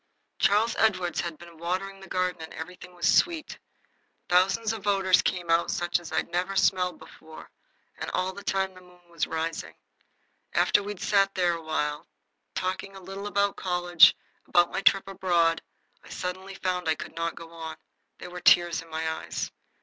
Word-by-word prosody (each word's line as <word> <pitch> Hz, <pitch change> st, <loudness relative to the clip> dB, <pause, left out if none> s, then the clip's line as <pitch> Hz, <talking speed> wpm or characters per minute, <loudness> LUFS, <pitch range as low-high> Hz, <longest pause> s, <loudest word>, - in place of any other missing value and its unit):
Charles 215 Hz, +3 st, +3 dB
Edward 185 Hz, -6 st, +2 dB
had 170 Hz, -2 st, -3 dB
been 170 Hz, -1 st, -14 dB
watering 190 Hz, +3 st, -3 dB
the 195 Hz, -, -12 dB
garden, 180 Hz, -1 st, -1 dB
and 160 Hz, -, -8 dB
everything 180 Hz, 0 st, -9 dB
was 175 Hz, -1 st, 0 dB
sweet. 325 Hz, -, +2 dB, 0.7 s
Thousands 195 Hz, +5 st, +3 dB
of 210 Hz, -2 st, -7 dB
odors 195 Hz, -2 st, +4 dB
came 175 Hz, -2 st, -1 dB
out 165 Hz, +1 st, +3 dB
such 175 Hz, 0 st, 0 dB
as 175 Hz, -, -10 dB
I -, -, +1 dB
never 180 Hz, +3 st, -2 dB
smelled 180 Hz, -2 st, +2 dB
before. 160 Hz, 0 st, -13 dB, 0.5 s
And -, -, -4 dB
all 185 Hz, +1 st, -1 dB
the 200 Hz, -, -10 dB
time 190 Hz, -1 st, 0 dB
the 185 Hz, -, -14 dB
moon 180 Hz, -1 st, -21 dB
was 165 Hz, -2 st, -1 dB
rising. 160 Hz, 0 st, -3 dB, 0.8 s
After -, -, +4 dB
we 205 Hz, +1 st, -4 dB
had 195 Hz, -, -14 dB
sat 195 Hz, -1 st, +2 dB
there 175 Hz, -2 st, +2 dB
awhile, 155 Hz, -2 st, -2 dB, 0.5 s
talking 190 Hz, +1 st, -3 dB
a -, -, -9 dB
little 195 Hz, +2 st, -7 dB
about 200 Hz, -1 st, +1 dB
college, 175 Hz, -2 st, +5 dB, 0.3 s
about 175 Hz, -1 st, +4 dB
my -, -, -2 dB
trip 195 Hz, 0 st, +4 dB
abroad, 175 Hz, -4 st, +2 dB, 0.4 s
I -, -, -15 dB
suddenly 185 Hz, +1 st, -5 dB
found 180 Hz, -3 st, -1 dB
I 160 Hz, -, +3 dB
could -, -, -9 dB
not 165 Hz, 0 st, -2 dB
go 165 Hz, 0 st, -10 dB
on. 160 Hz, -1 st, -7 dB, 0.4 s
There 180 Hz, -, -9 dB
were 180 Hz, 0 st, -7 dB
tears 175 Hz, -1 st, +5 dB
in 165 Hz, -, -15 dB
my 160 Hz, 0 st, -3 dB
eyes. 160 Hz, -, -3 dB
180 Hz, 180 wpm, -27 LUFS, 170-195 Hz, 0.8 s, college